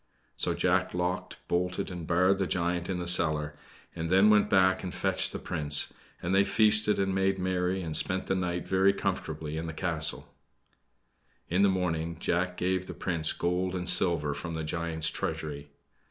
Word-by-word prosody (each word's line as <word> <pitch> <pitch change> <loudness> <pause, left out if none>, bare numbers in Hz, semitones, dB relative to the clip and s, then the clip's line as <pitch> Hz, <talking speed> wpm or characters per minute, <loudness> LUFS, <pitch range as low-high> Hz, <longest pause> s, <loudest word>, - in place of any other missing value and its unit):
So - - -1
Jack - - +1
locked, 90 +1 -3
bolted 90 +1 -1
and 85 -3 -7
barred 90 +3 +2
the 95 - 0
giant 85 0 -1
in 95 - -1
the 90 -1 -4
cellar, 75 -4 +3 0.4
and 80 0 -4
then 95 +4 +5
went 105 -1 +4
back 95 -1 +3
and 90 - -4
fetched - - 0
the - - -5
Prince, 75 -1 +2 0.3
and 85 +2 -1
they 100 +1 +5
feasted 105 0 +3
and 95 -1 0
made 95 0 +1
merry, 90 0 -1
and 80 -2 -4
spent 95 -1 +1
the - - -1
night 90 -2 -2
very 95 +1 +3
comfortably 80 -5 -4
in 80 +1 -4
the 80 - -5
castle. 80 -2 -1 1.2
In 90 +3 +1
the 100 - +5
morning 85 -3 -2
Jack 90 +2 -1
gave 95 0 -1
the - - -7
Prince 85 -4 0
gold 90 +1 -1
and 90 -1 -4
silver 80 -6 +1
from 85 +3 -6
the 80 - -3
giant's 80 0 -1
treasury. 75 -2 -5
90 Hz, 180 wpm, -28 LUFS, 80-95 Hz, 1.2 s, then